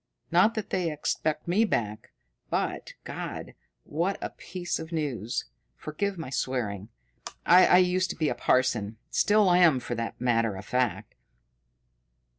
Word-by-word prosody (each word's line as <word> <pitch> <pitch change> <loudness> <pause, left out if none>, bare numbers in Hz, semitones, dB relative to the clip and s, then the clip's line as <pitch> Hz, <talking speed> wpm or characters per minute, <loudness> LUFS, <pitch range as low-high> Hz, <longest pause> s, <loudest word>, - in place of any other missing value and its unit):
Not 180 +7 +4
that 220 -3 -4
they 180 -3 0
expect 150 +1 -2
me 190 +6 +3
back. 110 - -2 0.4
But - - -2
God, - - -6 0.3
what 175 +6 -1
a - - -5
piece 180 -1 -5
of 160 +1 -8
news! 135 - -2 0.3
Forgive 190 - -3
my 155 -6 -6
swearing 110 -7 -2 0.6
I 180 +1 +7
used 185 0 +2
to - - -4
be 155 - 0
a - - +1
parson. 120 -3 +1
Still 210 -3 +4
am, 175 -6 +5
for 120 - -5
the 115 -1 -3
matter 115 -3 +1
of 95 +2 -10
that." 115 -6 +1
150 Hz, 140 wpm, -27 LUFS, 115-180 Hz, 0.6 s, I